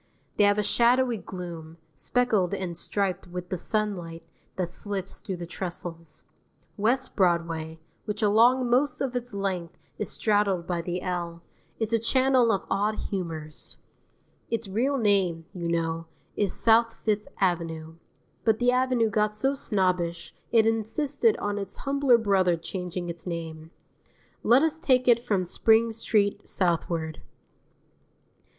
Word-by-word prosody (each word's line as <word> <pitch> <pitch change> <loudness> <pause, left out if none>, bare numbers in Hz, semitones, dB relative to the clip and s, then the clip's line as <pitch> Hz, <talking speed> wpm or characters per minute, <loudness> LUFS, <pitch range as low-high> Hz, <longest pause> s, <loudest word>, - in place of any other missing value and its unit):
They 205 - +5
have 205 0 +4
a 210 - +2
shadowy 240 +3 +3
gloom, 170 -3 -8 0.2
speckled 200 - +1
and 185 -3 -4
striped 190 +1 -1
with 180 0 -6
the 185 - -1
sunlight 175 -5 -2 0.3
that 180 -2 -2
slips 195 0 -5
through 190 - -4
the 175 - -6
trestles. 170 -2 -7 0.5
West 240 +5 0
Broadway, 165 -3 0 0.3
which 210 0 -3
along 240 +5 +5
most 255 +4 +2
of 255 -2 -2
its 245 0 -3
length 190 -4 -3 0.2
is 210 - -1
straddled 205 -5 +1
by 175 -1 -2
the 175 +1 -4
L, 170 -2 -3 0.3
is 225 0 -2
a 230 - +4
channel 255 0 +3
of 195 - -1
odd 205 +2 0 0.2
humours. 160 -5 -6 0.7
Its 230 -2 -2
real 250 +8 0
name, 195 -7 +1
you 175 -2 -4
know, 165 -1 -1 0.3
is 205 -3 0
South 230 0 +3
Fifth 210 -1 -1
Avenue; 165 -3 -1 0.5
but 220 -2 +3
the 245 +1 +3
Avenue 250 -2 +2
got 210 +1 +1
so 265 +6 +1
snobbish 180 -8 -1 0.2
it 225 -2 +5
insisted 270 - +1
on 205 0 -2
its 195 -1 -6
humbler 275 -3 +3
brother 190 -6 +2
changing 180 +1 -5
its 170 +1 -7
name. 160 -2 -5 0.7
Let 245 +6 +5
us 320 0 0
take 255 -7 +2
it 235 -1 +5
from 205 -6 +1
Spring 225 +5 +3
Street 210 -2 0
southward. 165 -3 -1
200 Hz, 140 wpm, -27 LUFS, 170-230 Hz, 0.7 s, They